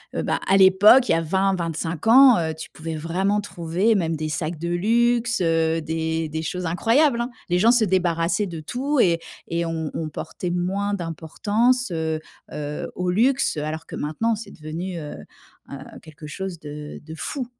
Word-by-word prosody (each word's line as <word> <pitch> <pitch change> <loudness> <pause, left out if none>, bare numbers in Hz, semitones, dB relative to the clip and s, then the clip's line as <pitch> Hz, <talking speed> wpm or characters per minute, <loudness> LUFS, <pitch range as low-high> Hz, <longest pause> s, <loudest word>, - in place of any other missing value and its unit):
heu, - - -1
bah, - - -1
à 195 - +4
l'époque, 200 +7 +6
il - - +5
y - - +4
a - - +2
20-25 170 -1 -1
ans, 255 +1 +8
heu, 160 -1 -1
tu 160 - -9
pouvais 160 0 -6
vraiment 190 +6 0
trouver 185 +3 0
même 165 -4 0
des 155 0 -3
sacs 155 +1 -3
de 170 +1 -3
luxe, 235 +5 +1
heu, 165 -1 +1
des 160 0 -2
des 160 +1 -3
choses 180 +3 -4
incroyables, 235 - +2
hein? 240 - -2 0.2
Les 180 0 +2
gens 230 +4 +5
se 240 -3 +3
débarrassaient 180 +1 +1
de 170 -3 -7
tout 270 - -2
et 170 -2 +3 0.3
et 170 0 -1
on 160 -2 -3
on 160 - -3
portait 175 +3 -5
moins 195 +3 -1
d'importance, 205 +8 0
heu 160 -1 -2 0.3
heu, 150 0 -5
au 180 0 -2
luxe, 250 - +2
alors 155 +2 -4
que - - -8
maintenant 220 +10 -1
c'est 215 +1 -9
devenu, 170 +4 -6
heu, 150 -2 -7 0.6
heu, - - -5 0.3
quelque 155 -1 -12
chose 185 +1 -6
de 150 0 -8
de 160 +1 -9
fou. 255 - -4
175 Hz, 185 wpm, -23 LUFS, 160-205 Hz, 0.6 s, ans